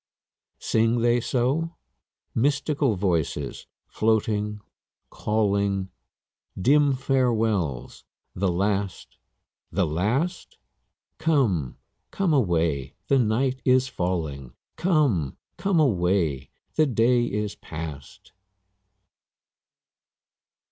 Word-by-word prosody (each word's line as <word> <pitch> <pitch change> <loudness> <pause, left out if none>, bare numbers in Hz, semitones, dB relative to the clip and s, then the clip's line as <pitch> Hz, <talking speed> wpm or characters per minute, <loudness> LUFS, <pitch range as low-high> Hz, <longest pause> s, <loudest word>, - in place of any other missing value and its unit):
Sing 115 +1 +1
they 120 +1 +3
so? 140 +9 0 0.6
Mystical 140 -1 +1
voices, 85 -7 -2 0.2
floating, 105 -1 0 0.5
calling; 100 -3 0 0.7
Dim 140 +7 +4
farewells 115 - 0 0.3
the 95 +2 0
last, 100 +1 -2 0.5
the - - +1
last? 115 - -1 0.6
Come, 110 - +1 0.3
come 190 -5 0
away, 80 - +1
the 140 - +4
night 130 +3 +1
is 130 0 +3
falling; 80 - -3 0.2
'Come, 150 - +1 0.2
come 195 -4 +1
away, 90 - +1 0.2
the 155 -1 +3
day 120 0 +3
is 105 -2 -2
past.' 75 -3 -9
110 Hz, 80 wpm, -25 LUFS, 90-130 Hz, 0.7 s, Dim